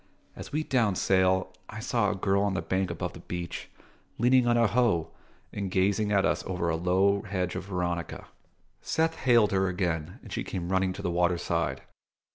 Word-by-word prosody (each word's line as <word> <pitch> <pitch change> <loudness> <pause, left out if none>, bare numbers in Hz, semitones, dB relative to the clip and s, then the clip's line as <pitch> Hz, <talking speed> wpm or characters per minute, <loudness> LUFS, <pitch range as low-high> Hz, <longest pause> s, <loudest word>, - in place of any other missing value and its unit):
As - - -9
we 155 +2 -1
downed 115 -10 +1
sail, 95 -1 +2 0.2
I 110 - -7
saw 115 -3 +1
a 105 - -1
girl 95 +1 +1
on 100 -2 0
the - - -2
bank 95 0 -1
above - - -4
the - - -10
beach, 85 -1 -6 0.5
leaning 125 +1 +4
on 120 0 +3
a 115 - +4
hoe 115 -8 +1 0.4
and 100 -2 -3
gazing 100 +3 +1
at 100 -1 +3
us - - 0
over 90 -3 -1
a 80 - +1
low 95 +4 +2
hedge 90 -3 -2
of - - -5
veronica. 90 -3 -3 0.6
Seth 160 0 0
hailed 120 -8 +3
her 95 -1 +2
again, 90 -3 -2
and - - -9
she - - -2
came 85 -2 -4
running 95 0 +1
to - - -8
the 90 - -1
waterside. 85 -5 0
95 Hz, 190 wpm, -28 LUFS, 90-105 Hz, 0.6 s, leaning